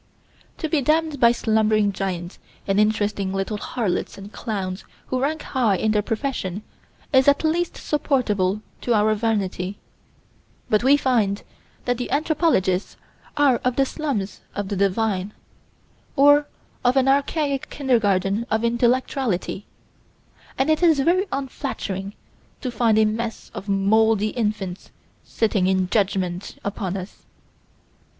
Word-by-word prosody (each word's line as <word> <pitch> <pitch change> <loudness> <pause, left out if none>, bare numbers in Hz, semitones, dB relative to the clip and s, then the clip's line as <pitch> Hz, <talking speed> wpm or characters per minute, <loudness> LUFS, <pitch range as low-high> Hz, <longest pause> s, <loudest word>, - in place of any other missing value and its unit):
To 320 - -2
be 305 -1 +1
damned 310 +1 +1
by 235 -1 +6
slumbering 215 -3 +2
giants 180 -2 -4 0.3
and 195 +1 +1
interesting 210 -2 +1
little 195 +2 -2
harlots 210 -3 -2
and 200 +2 -10
clowns 195 -4 -4 0.2
who 255 0 -2
rank 305 +3 -1
high 240 -7 +1
in 215 +4 +1
their 210 -1 +2
profession 215 -4 -3 0.5
is 265 0 +5
at 285 +2 +4
least 335 +2 0
supportable 215 -10 0 0.2
to 240 - +1
our 215 +1 +3
vanity; 205 -3 -1 0.9
but, 215 +1 +3
we 275 +3 +6
find 225 -8 +1 0.4
that 245 -1 0
the 245 - -3
anthropologists 290 - +1 0.4
are 280 -4 +4
of 250 +1 -1
the 275 - +3
slums 260 - -3
of 205 -2 -3
the 205 - -2
divine, 200 0 0 0.8
or 290 +1 +6 0.4
of 250 +2 +3
an 265 0 +3
archaic 280 +1 +1
kindergarten 220 -5 +1
of 220 +1 0
intellectuality, 235 -4 0 0.9
and 270 +4 +2
it 310 - +1
is 325 -5 +5
very 370 +7 +2
unflattering 220 -8 -4 0.5
to 255 - -3
find 230 -2 +2
a 220 - +5
mess 225 +1 -3
of 200 - -7
moldy 215 +2 +3
infants 210 -5 -3 0.3
sitting 210 -5 0
in 190 -1 +2
judgment 190 -3 -1
upon 195 -2 -3
us. 185 +1 -10
220 Hz, 130 wpm, -23 LUFS, 200-270 Hz, 0.9 s, by